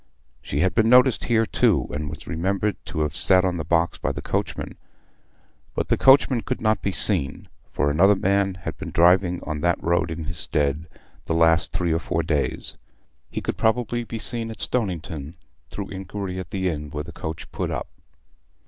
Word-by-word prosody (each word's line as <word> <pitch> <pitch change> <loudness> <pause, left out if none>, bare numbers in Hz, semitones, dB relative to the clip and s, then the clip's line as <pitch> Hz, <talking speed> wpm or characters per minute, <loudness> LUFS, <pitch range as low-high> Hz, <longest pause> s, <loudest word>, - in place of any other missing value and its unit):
She 70 - -2
had 95 - +2
been 110 -1 +3
noticed 125 -1 +5
here 115 -1 +2
too, - - +2
and 75 0 -4
was 75 - -9
remembered 95 +4 -1
to 80 - -3
have 75 0 -1
sat 95 +3 +5
on 90 -1 0
the 80 - -3
box 85 +2 0
by - - -1
the - - -6
coachman; - - -3 1.0
but - - -2
the - - +4
coachman 135 -2 +5
could 130 - -3
not 110 -1 +1
be 100 - -1
seen, 70 -6 +1 0.2
for 75 - 0
another 95 +7 +5
man 95 0 +1
had 85 - -6
been - - -6
driving 90 +1 +3
on 75 -1 -4
that 85 0 +2
road 85 0 +1
in 80 0 -5
his 85 +1 +1
stead 75 +1 +1 0.4
the 80 - -1
last 80 0 +3
three 85 -2 0
or 80 - +1
four 85 0 -2
days. 75 -2 -2 0.5
He - - -4
could - - -3
probably 120 +1 0
be 115 0 -6
seen 115 0 -1
at 110 - -8
Stoniton, 85 - -3 0.3
through 100 -2 -6
inquiry 95 0 -5
at 95 - -7
the 95 -1 -2
inn 75 -3 -3
where 75 0 -5
the 85 - -10
coach 80 -1 -7
put - - -3
up. - - -4
90 Hz, 195 wpm, -23 LUFS, 80-105 Hz, 1.0 s, noticed